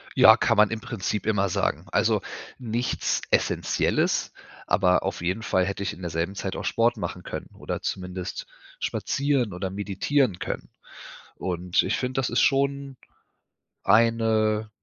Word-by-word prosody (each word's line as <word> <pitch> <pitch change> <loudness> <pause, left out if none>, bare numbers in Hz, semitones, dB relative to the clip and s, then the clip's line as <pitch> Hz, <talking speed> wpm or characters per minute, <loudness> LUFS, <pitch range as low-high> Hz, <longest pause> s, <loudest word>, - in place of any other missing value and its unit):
Ja, 110 +1 +8
kann 115 -1 +2
man 105 -1 +6
im 110 - -2
Prinzip 105 -1 -3
immer 100 -3 +1
sagen. - - -1
Also, - - +2 0.4
nichts 120 0 -1
Essenzielles, - - +1 0.3
aber 90 0 +3
auf 95 -2 -3
jeden 95 +6 -2
Fall 95 -3 +2
hätte 100 0 -3
ich 100 +2 -2
in 95 - -12
derselben 85 +3 -2
Zeit 95 -1 -4
auch - - -5
Sport 115 +1 +2
machen - - -5
können - - -6
oder - - -4
zumindest 90 -1 -4 0.3
spazieren 135 -7 0
oder 95 +1 -3
meditieren 100 +3 0
können. - - -5 0.7
Und 90 -1 0
ich - - 0
finde, 130 +1 -2
das 125 - 0
ist 120 - +2
schon 140 -1 +1 0.9
eine 110 0 +3
105 Hz, 145 wpm, -25 LUFS, 95-120 Hz, 0.9 s, Ja